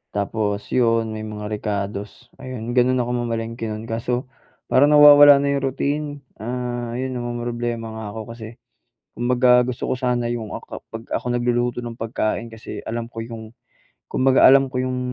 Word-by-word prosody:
Tapos 100 Hz, 0 st, -2 dB
yun, 115 Hz, -3 st, +2 dB
may 110 Hz, -, -5 dB
mga 105 Hz, -1 st, -6 dB
rekados, 105 Hz, +2 st, -4 dB
ayun, 120 Hz, -2 st, -5 dB
ganun 130 Hz, +1 st, +4 dB
ako 120 Hz, 0 st, -2 dB
mamalengke 115 Hz, -1 st, -3 dB
nun 110 Hz, +1 st, -5 dB
kaso 120 Hz, +2 st, -2 dB, 0.4 s
parang 145 Hz, +3 st, +5 dB
nawawala 145 Hz, -1 st, +9 dB
na 140 Hz, 0 st, +1 dB
yung 140 Hz, -1 st, -1 dB
routine. 145 Hz, +3 st, -2 dB, 0.3 s
Ah, 120 Hz, 0 st, -4 dB
'yon 130 Hz, 0 st, -3 dB
namomroblema 120 Hz, -1 st, -3 dB
nga 110 Hz, -1 st, -6 dB
ako 110 Hz, +1 st, -7 dB
kasi 115 Hz, 0 st, -10 dB, 0.6 s
kumbaga 125 Hz, 0 st, +4 dB
gusto 125 Hz, -, -3 dB
ko -, -, +2 dB
sana 120 Hz, -2 st, 0 dB
yung 110 Hz, -3 st, -5 dB
ak -, -, -8 dB, 0.2 s
'pag 115 Hz, 0 st, -7 dB
ako -, -, -2 dB
nagluluto 120 Hz, 0 st, 0 dB
ng 120 Hz, -1 st, -6 dB
pagkain 115 Hz, 0 st, -2 dB
kasi 110 Hz, 0 st, -8 dB
alam 115 Hz, 0 st, -3 dB
ko 115 Hz, -, -6 dB
yung 110 Hz, -1 st, -9 dB, 0.6 s
kumbaga 130 Hz, 0 st, +3 dB
alam 135 Hz, 0 st, +6 dB
ko 125 Hz, -, -1 dB
yung, 130 Hz, 0 st, -2 dB
120 Hz, 165 wpm, -22 LUFS, 115-125 Hz, 0.6 s, nawawala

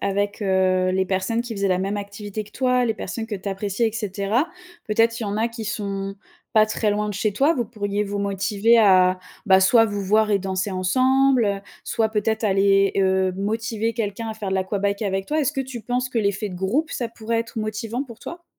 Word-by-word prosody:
avec, 200 Hz, +1 st, -1 dB
heu, 185 Hz, -1 st, +2 dB
les 190 Hz, +1 st, +1 dB
personnes 190 Hz, +5 st, 0 dB
qui 240 Hz, -2 st, -6 dB
faisaient 200 Hz, -1 st, 0 dB
la 185 Hz, -, +2 dB
même 195 Hz, +2 st, -2 dB
activité 205 Hz, +1 st, -5 dB
que 210 Hz, -, -17 dB
toi, 250 Hz, -1 st, +2 dB
les 225 Hz, -2 st, 0 dB
personnes 225 Hz, +1 st, -5 dB
que 220 Hz, -, -4 dB
tu 195 Hz, 0 st, -5 dB
appréciais 200 Hz, +3 st, -1 dB
et -, -, -8 dB
cetera, 210 Hz, -, -1 dB, 0.4 s
peut-être 230 Hz, +2 st, +2 dB
il -, -, -2 dB
y -, -, -3 dB
en 200 Hz, +1 st, -2 dB
a 225 Hz, +2 st, +1 dB
qui 230 Hz, -1 st, -7 dB
sont 195 Hz, -3 st, -4 dB, 0.4 s
pas 215 Hz, -1 st, +6 dB
très 215 Hz, 0 st, 0 dB
loin 210 Hz, +1 st, -1 dB
de 210 Hz, -, -4 dB
chez 210 Hz, +1 st, 0 dB
toi, 280 Hz, +10 st, +3 dB
vous 250 Hz, -7 st, -1 dB
pourriez 205 Hz, -2 st, -2 dB
vous 205 Hz, 0 st, -4 dB
motiver 200 Hz, +3 st, +2 dB
à, 185 Hz, -3 st, +5 dB, 0.3 s
bah, 190 Hz, -3 st, +6 dB
soit 225 Hz, +5 st, +6 dB
vous 205 Hz, -1 st, -3 dB
voir 215 Hz, +2 st, +2 dB
et 200 Hz, -, +3 dB
danser 190 Hz, +1 st, -2 dB
ensemble, 255 Hz, +7 st, +3 dB
heu, 200 Hz, -1 st, -1 dB, 0.2 s
soit 225 Hz, -2 st, 0 dB
peut-être 220 Hz, +1 st, -1 dB
aller, 195 Hz, 0 st, +3 dB
heu, 190 Hz, -1 st, +2 dB
motiver 225 Hz, +2 st, -1 dB
quelqu'un 225 Hz, 0 st, -3 dB
à 220 Hz, -, -4 dB
faire 210 Hz, -3 st, -5 dB
de -, -, 0 dB
l'aquabike 200 Hz, +2 st, -1 dB
avec 195 Hz, -1 st, -1 dB
toi? 310 Hz, +1 st, 0 dB
Est-ce 285 Hz, -1 st, +1 dB
que 270 Hz, -, -2 dB
tu 260 Hz, -3 st, -6 dB
penses 250 Hz, +3 st, -1 dB
que 245 Hz, -2 st, -2 dB
l'effet 200 Hz, 0 st, 0 dB
de 185 Hz, -, -8 dB
groupe, 215 Hz, -, -1 dB
ça 240 Hz, -, -2 dB
pourrait 230 Hz, 0 st, -2 dB
être 230 Hz, 0 st, -6 dB
motivant 220 Hz, +4 st, -3 dB
pour 230 Hz, -4 st, -13 dB
toi? 345 Hz, 0 st, -9 dB
210 Hz, 225 wpm, -23 LUFS, 195-230 Hz, 0.4 s, pas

